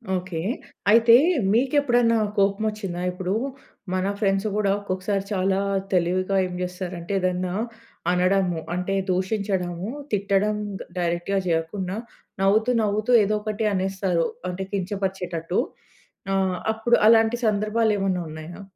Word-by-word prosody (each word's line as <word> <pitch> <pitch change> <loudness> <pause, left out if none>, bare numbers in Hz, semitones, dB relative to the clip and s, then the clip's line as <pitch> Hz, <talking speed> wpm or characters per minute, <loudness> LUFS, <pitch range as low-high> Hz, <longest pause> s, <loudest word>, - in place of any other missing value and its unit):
Okay. 180 -2 -3 0.5
అయితే 230 +1 +7 0.4
మీకెప్పుడన్నా 245 -2 +3 0.2
కోపం 200 +2 +2
వొచ్చిందా? 195 -5 -5
ఇప్పుడు 185 +1 -3 0.6
మన 185 0 0
ఫ్రెండ్స్ 195 0 +1
కూడా, 205 -2 +2
ఒక్కొక్కసారి 195 0 -2
చాలా 190 0 +1 0.3
తెలివిగా 185 +2 +1
ఏం 180 - -7
చేస్తారంటే, 180 0 -4
ఏదన్నా 180 0 -1 0.6
అనడము. 180 -1 +2 0.2
అంటే, 180 +2 -2 0.2
దూషించడము, 190 -1 -1 0.2
తిట్టడం 200 +1 +1 0.4
డైరెక్ట్‌గా 175 +3 0
చేయకుండా, 180 +4 -1 0.4
నవ్వుతూ, 215 +5 +3
నవ్వుతూ 215 +3 0
ఏదో 210 +2 +1
ఒకటి 215 0 -2
అనేస్తారు. 190 -3 0 0.2
అంటే, 185 +2 -4
కించపరిచేటట్టు. 185 -3 -2 0.7
ఆహ్, 190 -2 +1 0.2
అప్పుడు 235 +2 +2
అలాంటి 225 +1 +5
సందర్భాలు 215 +1 +1
ఏమన్నా 190 -2 0
ఉన్నాయా? 155 +5 -9
195 Hz, 110 wpm, -24 LUFS, 180-210 Hz, 0.7 s, అయితే